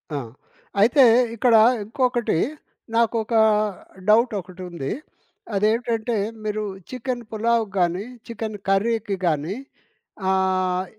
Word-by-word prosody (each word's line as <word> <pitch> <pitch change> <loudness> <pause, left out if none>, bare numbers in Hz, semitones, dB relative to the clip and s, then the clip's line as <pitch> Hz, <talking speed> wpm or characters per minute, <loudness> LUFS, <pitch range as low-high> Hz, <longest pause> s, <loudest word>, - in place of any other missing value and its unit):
ఆ! - - 0 0.6
అయితే 245 +6 +6 0.3
ఇక్కడ 235 0 +4 0.3
ఇంకొకటి, 240 -3 0 0.6
నాకొక 230 0 +1 0.8
డౌట్ 230 +2 +5
ఒకటుంది. 180 -5 -7 0.6
అదేంటంటే, 225 +2 +1 0.3
మీరు 215 0 -2 0.3
చికెను 250 -1 -4
పులావుకి 225 -1 0
గానీ, 175 +2 +1 0.2
చికెన్ 220 -2 -5
కర్రీకి 210 +1 +1
గానీ, 160 +3 0 0.7
ఆహ్, 185 -1 +1
215 Hz, 85 wpm, -23 LUFS, 190-235 Hz, 0.8 s, అయితే